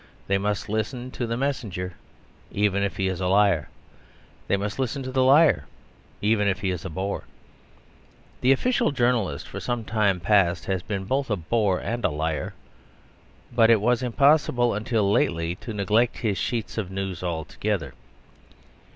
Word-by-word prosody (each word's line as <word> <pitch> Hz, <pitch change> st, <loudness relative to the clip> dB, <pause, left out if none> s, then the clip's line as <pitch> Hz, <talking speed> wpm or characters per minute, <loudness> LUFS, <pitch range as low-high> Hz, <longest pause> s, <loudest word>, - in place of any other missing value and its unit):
They 100 Hz, 0 st, +1 dB
must 105 Hz, 0 st, -2 dB
listen 120 Hz, +4 st, -3 dB
to 120 Hz, -, -3 dB
the 115 Hz, +1 st, -2 dB
messenger, 105 Hz, -10 st, -3 dB, 0.6 s
even 100 Hz, -1 st, +1 dB
if 100 Hz, 0 st, -2 dB
he 95 Hz, -, 0 dB
is 95 Hz, -1 st, -3 dB
a 90 Hz, -, 0 dB
liar. 95 Hz, -5 st, +3 dB, 0.8 s
They 100 Hz, -, +2 dB
must 100 Hz, +5 st, -4 dB
listen 135 Hz, +1 st, -2 dB
to 130 Hz, -, -5 dB
the 130 Hz, 0 st, +2 dB
liar, 145 Hz, +4 st, +5 dB, 0.6 s
even 105 Hz, -1 st, +2 dB
if 100 Hz, +1 st, 0 dB
he 95 Hz, -2 st, 0 dB
is 90 Hz, -3 st, -4 dB
a 95 Hz, -, -5 dB
bore. 95 Hz, -2 st, -3 dB, 1.2 s
The 130 Hz, -, +4 dB
official 240 Hz, -, +2 dB
journalist 120 Hz, -, 0 dB
for -, -, -6 dB
some 120 Hz, -2 st, -3 dB
time 105 Hz, -4 st, +1 dB
past 90 Hz, -1 st, +2 dB
has 95 Hz, -2 st, -1 dB
been 95 Hz, 0 st, -4 dB
both 135 Hz, +5 st, -1 dB
a 105 Hz, -, +2 dB
bore 95 Hz, +2 st, +1 dB
and 120 Hz, 0 st, -3 dB
a -, -, +3 dB
liar; 75 Hz, -1 st, -3 dB, 1.0 s
but 115 Hz, 0 st, +5 dB
it 115 Hz, -2 st, +6 dB
was 120 Hz, +3 st, +2 dB
impossible 125 Hz, -1 st, +3 dB
until 105 Hz, -1 st, 0 dB
lately 85 Hz, -3 st, +1 dB
to 115 Hz, -, -8 dB
neglect 105 Hz, +3 st, +1 dB
his 105 Hz, -5 st, -1 dB
sheets 115 Hz, -2 st, -2 dB
of 100 Hz, -4 st, -3 dB
news 95 Hz, -2 st, -4 dB
altogether. 85 Hz, -3 st, -3 dB
105 Hz, 165 wpm, -25 LUFS, 95-120 Hz, 1.2 s, it